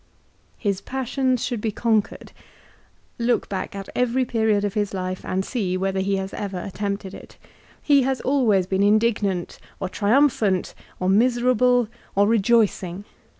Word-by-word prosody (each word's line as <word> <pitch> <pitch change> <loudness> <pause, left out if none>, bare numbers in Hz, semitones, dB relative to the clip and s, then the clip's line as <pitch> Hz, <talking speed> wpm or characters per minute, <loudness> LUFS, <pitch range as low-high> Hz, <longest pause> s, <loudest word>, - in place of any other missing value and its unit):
His 200 -3 -1
passions 260 0 -1
should 240 -4 -3
be 220 - -1
conquered. 220 -1 -1 0.9
Look 240 +1 +1
back 190 0 -4
at 195 -1 -6
every 250 +1 +1
period 220 -3 +1
of 200 - -2
his 205 -2 -1
life, 185 0 -4
and 190 +1 -2
see 190 -7 -2
whether 190 0 -1
he 195 +1 0
has 190 0 -4
ever 195 -3 -4
attempted 200 +1 -4
it. - - -12 0.5
He 285 -2 +5
has 265 0 0
always 235 -9 +2
been 190 +1 -1
indignant, 205 -3 +1 0.2
or 190 - -3
triumphant, 215 -3 +2 0.3
or 185 - -1
miserable, 245 +3 +3 0.3
or 200 +1 +4
rejoicing. 205 -4 +1
210 Hz, 145 wpm, -23 LUFS, 195-240 Hz, 0.9 s, He